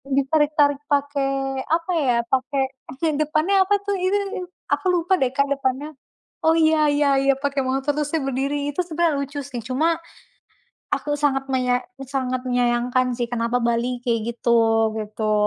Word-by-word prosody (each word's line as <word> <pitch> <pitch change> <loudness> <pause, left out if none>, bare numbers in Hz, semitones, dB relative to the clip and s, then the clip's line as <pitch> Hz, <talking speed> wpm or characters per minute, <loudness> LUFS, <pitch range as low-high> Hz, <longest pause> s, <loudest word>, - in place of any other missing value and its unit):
ditarik-tarik 290 0 +2
pakai, 275 -2 0
apa 330 +2 0
ya, 250 -5 +2
pakai 265 +1 +1 0.3
bagian 295 +3 -1
depannya 310 +6 +1
apa 410 +1 +3
tuh 405 -1 0
itu, 375 +3 +1 0.5
aku - - 0
lupa 355 +2 +2
deh, 255 -1 +2
Kak, 280 0 +2
depannya. 275 +2 -1 0.5
Oh, 320 - +5
iya 315 -1 +4
iya 290 0 +2
iya, 275 0 +4
pakai 280 0 -1
motor 270 +2 0
terus 295 -1 -1
dia 320 - +1
berdiri, 275 +2 -1
itu 360 - -1
sebenarnya 325 -3 0
lucu 280 +1 -4
sih, 255 -4 -6
cuma, 315 +6 +1 1.0
aku 295 - -2
sangat 270 -2 +1
menya 250 -1 +1 0.3
sangat 255 -2 -2
menyayangkan 245 +1 +1
sih 240 - +1
kenapa 235 +1 0
Bali 235 +1 0
kayak 230 -2 +1 0.2
gitu, 225 -2 +3
gitu. 215 0 -2
275 Hz, 155 wpm, -22 LUFS, 250-300 Hz, 1.0 s, Oh